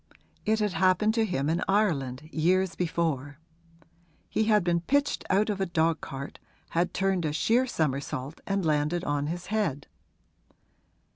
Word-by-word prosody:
It 220 Hz, +1 st, +3 dB
had 210 Hz, -3 st, 0 dB
happened 185 Hz, +5 st, +3 dB
to 225 Hz, -1 st, +2 dB
him 140 Hz, -8 st, -1 dB
in 165 Hz, +3 st, +1 dB
Ireland, 155 Hz, -9 st, 0 dB
years 185 Hz, +3 st, +2 dB
before; 160 Hz, -5 st, -1 dB, 0.9 s
he 220 Hz, -, +1 dB
had 215 Hz, -3 st, +4 dB
been 170 Hz, -1 st, +1 dB
pitched 285 Hz, +10 st, +1 dB
out 200 Hz, +3 st, +3 dB
of 195 Hz, -1 st, -3 dB
a 190 Hz, -, +1 dB
dogcart, 160 Hz, -4 st, -2 dB, 0.3 s
had 175 Hz, +2 st, +1 dB
turned 195 Hz, -2 st, 0 dB
a 155 Hz, -, 0 dB
sheer 230 Hz, +12 st, +2 dB
somersault 140 Hz, -, -2 dB
and 195 Hz, -2 st, 0 dB
landed 155 Hz, +3 st, +1 dB
on 145 Hz, -2 st, -1 dB
his 175 Hz, +3 st, -4 dB
head. 165 Hz, -11 st, 0 dB
170 Hz, 145 wpm, -28 LUFS, 150-195 Hz, 0.9 s, had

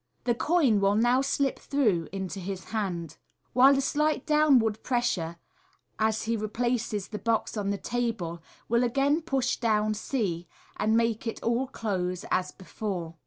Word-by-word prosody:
The 240 Hz, -, +2 dB
coin 270 Hz, -4 st, +2 dB
will 200 Hz, +1 st, +3 dB
now 240 Hz, +4 st, +3 dB
slip 275 Hz, 0 st, 0 dB
through 215 Hz, -, +1 dB
into 190 Hz, 0 st, -4 dB
his 185 Hz, 0 st, -5 dB
hntid, 175 Hz, -7 st, -3 dB, 0.4 s
while 270 Hz, +2 st, +6 dB
a -, -, +2 dB
slight 300 Hz, +2 st, 0 dB
downward 265 Hz, -8 st, +3 dB
pressure 180 Hz, -10 st, -1 dB, 0.6 s
as 220 Hz, 0 st, +1 dB
he 230 Hz, +1 st, 0 dB
replaces 220 Hz, -1 st, -2 dB
the 210 Hz, -, -5 dB
box 230 Hz, -1 st, 0 dB
on 205 Hz, -2 st, -2 dB
the 200 Hz, -, 0 dB
table 225 Hz, -7 st, -3 dB, 0.3 s
will 235 Hz, +2 st, +2 dB
again 275 Hz, +6 st, +2 dB
push 270 Hz, -5 st, 0 dB
down 215 Hz, -2 st, +1 dB
c, 205 Hz, -7 st, -2 dB, 0.3 s
and 220 Hz, +1 st, +2 dB
make 230 Hz, 0 st, 0 dB
all 235 Hz, +3 st, +1 dB
close 185 Hz, -7 st, -3 dB
as 185 Hz, 0 st, +1 dB
before. 185 Hz, -3 st, -5 dB
225 Hz, 150 wpm, -28 LUFS, 195-250 Hz, 0.6 s, while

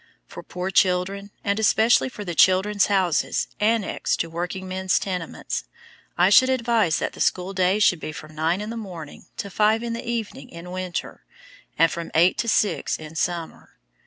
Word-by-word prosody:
For -, -, -10 dB
poor 180 Hz, +1 st, -5 dB
children, 190 Hz, +2 st, +1 dB
and 200 Hz, +1 st, 0 dB
especially 220 Hz, +4 st, +3 dB
for 210 Hz, -5 st, -8 dB
the 175 Hz, -, -4 dB
"Children's 190 Hz, +4 st, +4 dB
Houses" 190 Hz, -5 st, +1 dB
annexed 220 Hz, 0 st, 0 dB
to 165 Hz, -, -5 dB
workingmen's 185 Hz, +2 st, -2 dB
tenements, 180 Hz, -4 st, -4 dB, 0.5 s
I 180 Hz, +2 st, +4 dB
should 255 Hz, +5 st, +7 dB
advise 235 Hz, -9 st, +2 dB
that -, -, -3 dB
the -, -, -13 dB
school 185 Hz, +1 st, 0 dB
day 185 Hz, +1 st, +2 dB
should 195 Hz, -5 st, +3 dB
be 155 Hz, -, -5 dB
from 155 Hz, 0 st, -10 dB
nine 165 Hz, +5 st, 0 dB
in 210 Hz, +2 st, -5 dB
the 230 Hz, -, -5 dB
morning 175 Hz, -7 st, -9 dB
to 200 Hz, -, -5 dB
five 215 Hz, +3 st, +2 dB
in 235 Hz, -1 st, -3 dB
the 230 Hz, -, -5 dB
evening 230 Hz, -, -4 dB
in 170 Hz, +1 st, -10 dB
winter, 185 Hz, -1 st, -5 dB, 0.5 s
and 165 Hz, -, +4 dB
from 170 Hz, -1 st, -5 dB
eight 175 Hz, +3 st, +4 dB
to 235 Hz, -, -1 dB
six 215 Hz, -2 st, +1 dB
in 155 Hz, 0 st, -10 dB
summer. 170 Hz, 0 st, -4 dB
190 Hz, 175 wpm, -23 LUFS, 175-210 Hz, 0.5 s, should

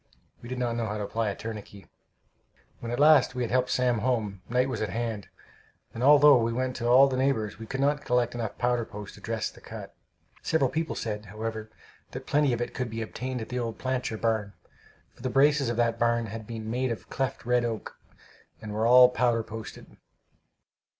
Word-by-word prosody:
We 120 Hz, -, -10 dB
did 130 Hz, -, -4 dB
not 120 Hz, -2 st, -1 dB
know 115 Hz, -1 st, -2 dB
how 105 Hz, 0 st, -3 dB
to 105 Hz, -, -3 dB
apply 110 Hz, +1 st, -1 dB
a 100 Hz, -, -4 dB
tourniquet. 105 Hz, -3 st, -8 dB, 0.9 s
When 115 Hz, -, -5 dB
at 120 Hz, -, -2 dB
last 145 Hz, -3 st, +5 dB
we 125 Hz, -, -1 dB
had 115 Hz, -, -3 dB
helped 130 Hz, 0 st, +2 dB
Sam 125 Hz, -2 st, +1 dB
home, 110 Hz, -5 st, -1 dB
night 125 Hz, +2 st, +2 dB
was 130 Hz, -5 st, -3 dB
at 110 Hz, -, -1 dB
hand; 110 Hz, 0 st, -3 dB, 0.7 s
and 115 Hz, -, -6 dB
although 145 Hz, 0 st, +7 dB
we 115 Hz, 0 st, 0 dB
went 130 Hz, +2 st, -2 dB
to 120 Hz, -, -2 dB
all 130 Hz, +3 st, +7 dB
the 130 Hz, -1 st, -2 dB
neighbors, 130 Hz, -6 st, 0 dB
we 110 Hz, -, -8 dB
could 135 Hz, +3 st, -3 dB
not 145 Hz, +1 st, +1 dB
collect 125 Hz, -1 st, +1 dB
enough 115 Hz, -3 st, -4 dB
powder 120 Hz, -1 st, +1 dB
post 105 Hz, -3 st, -9 dB
to -, -, -14 dB
dress -, -, -3 dB
the -, -, -17 dB
cut. -, -, -9 dB, 0.5 s
Several 150 Hz, -6 st, +1 dB
people 160 Hz, 0 st, -2 dB
said, 105 Hz, -1 st, -4 dB
however, 110 Hz, +2 st, -5 dB, 0.4 s
that -, -, -7 dB
plenty 145 Hz, -2 st, +2 dB
of 120 Hz, 0 st, -1 dB
it 120 Hz, -, -3 dB
could 125 Hz, -2 st, -3 dB
be 115 Hz, 0 st, -4 dB
obtained 125 Hz, +2 st, -5 dB
at 110 Hz, -, -7 dB
the 125 Hz, -, -2 dB
old 115 Hz, -2 st, -3 dB
Plancher 130 Hz, -3 st, -2 dB
barn, 110 Hz, -3 st, -1 dB, 0.6 s
for -, -, -18 dB
the 130 Hz, -, -2 dB
braces 140 Hz, 0 st, +3 dB
of 120 Hz, -, -2 dB
that 115 Hz, -1 st, +1 dB
barn 115 Hz, 0 st, +2 dB
had 110 Hz, 0 st, -7 dB
been 110 Hz, -2 st, -6 dB
made 125 Hz, +1 st, -1 dB
of 115 Hz, -, -7 dB
cleft 135 Hz, -3 st, -3 dB
red 125 Hz, 0 st, +2 dB
oak, 115 Hz, -2 st, -4 dB, 0.6 s
and 105 Hz, -1 st, -7 dB
were 110 Hz, +2 st, +1 dB
"all 125 Hz, +1 st, +9 dB
powder 120 Hz, -2 st, +1 dB
posted." 110 Hz, 0 st, -10 dB
120 Hz, 210 wpm, -27 LUFS, 110-130 Hz, 0.9 s, all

